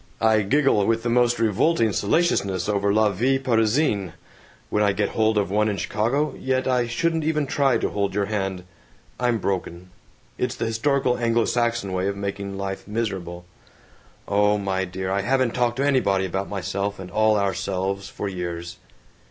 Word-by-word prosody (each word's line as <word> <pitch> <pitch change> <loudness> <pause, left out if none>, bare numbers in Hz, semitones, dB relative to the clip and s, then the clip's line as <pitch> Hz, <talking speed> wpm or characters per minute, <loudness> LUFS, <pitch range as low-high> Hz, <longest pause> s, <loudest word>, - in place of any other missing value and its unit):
I 110 -1 +4
giggle 135 0 +2
with 115 0 +1
the 120 - 0
most 120 0 +3
revolting 115 - +2
salaciousness 100 - +1
over 100 -1 +1
La 110 +1 +3
Vie 125 +8 +1
Parisienne, 115 - +1 0.6
when 105 - +1
I 100 -1 +3
get 100 0 0
hold 110 -1 +1
of 100 -2 0
one 105 +1 +2
in 100 - -2
Chicago, 120 +11 0
yet 130 0 0
I 125 -2 +1
shouldn't 160 +7 0
even 150 -1 0
try 135 -3 +2
to - - -1
hold 100 -2 -1
your 100 -1 +1
hand. 95 -3 -3 0.6
I'm 120 -2 +1
broken. 90 -2 -4 0.5
It's 125 -1 -1
the - - -2
historical 125 +3 +1
Anglo 115 -1 +2
Saxon 120 -5 0
way 95 +1 0
of 100 0 -2
making 100 0 -4
life 95 -1 -5
miserable.... 95 -6 -4 0.8
Oh, 105 +1 +3
my 95 -1 -1
dear, 95 +1 -4
I 100 +1 +1
haven't 130 +2 +1
talked 120 0 0
to 140 - +1
anybody 100 -9 +2
about 95 +2 -3
myself 100 +1 -3
and 90 -1 -9
all 110 +2 +3
our 100 -2 +1
selves 95 +1 -3
for 105 - -5
years." 85 -2 -5
105 Hz, 175 wpm, -23 LUFS, 95-120 Hz, 0.8 s, I